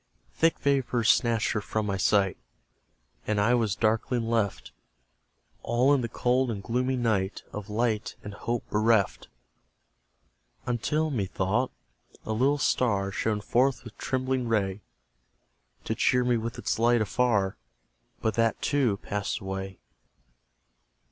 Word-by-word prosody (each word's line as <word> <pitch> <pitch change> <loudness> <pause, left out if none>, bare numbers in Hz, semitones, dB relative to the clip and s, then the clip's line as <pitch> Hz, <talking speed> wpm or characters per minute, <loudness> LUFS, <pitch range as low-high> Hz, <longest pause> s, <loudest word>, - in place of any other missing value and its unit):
Thick 165 0 +2
vapours 125 -4 +1
snatched 115 -3 +3
her 105 - -1
from 110 +1 -2
my 100 -1 -1
sight, 95 0 +2 0.9
And 105 -1 +1
I 110 +4 +3
was 110 -5 +1
darkling 115 +3 0
left, 100 - -1 0.9
All 125 +4 +3
in 140 - +2
the 115 - -3
cold 125 +2 +1
and 100 -4 -4
gloomy 125 +4 0
night, 105 -5 0
Of 105 0 -6
light 110 0 -1
and 105 - -7
hope 120 +3 -3
bereft: 110 -1 +2 1.4
Until, 150 +6 0
methought, 105 +1 0 0.5
a 110 - -2
little 135 +6 +2
star 100 -8 +1
Shone 105 +1 -1
forth 125 +5 +1
with 115 -2 -11
trembling 130 -1 -1
ray, 105 -3 0 1.0
To - - -2
cheer 125 0 +2
me 125 -1 +2
with 115 0 -3
its - - -2
light 120 0 +4
afar 105 -3 +1 0.7
But 110 - +1
that, 115 -1 +1
too, 130 -8 +1
passed 100 0 -2
away. 95 -1 -5
115 Hz, 130 wpm, -27 LUFS, 105-125 Hz, 1.4 s, light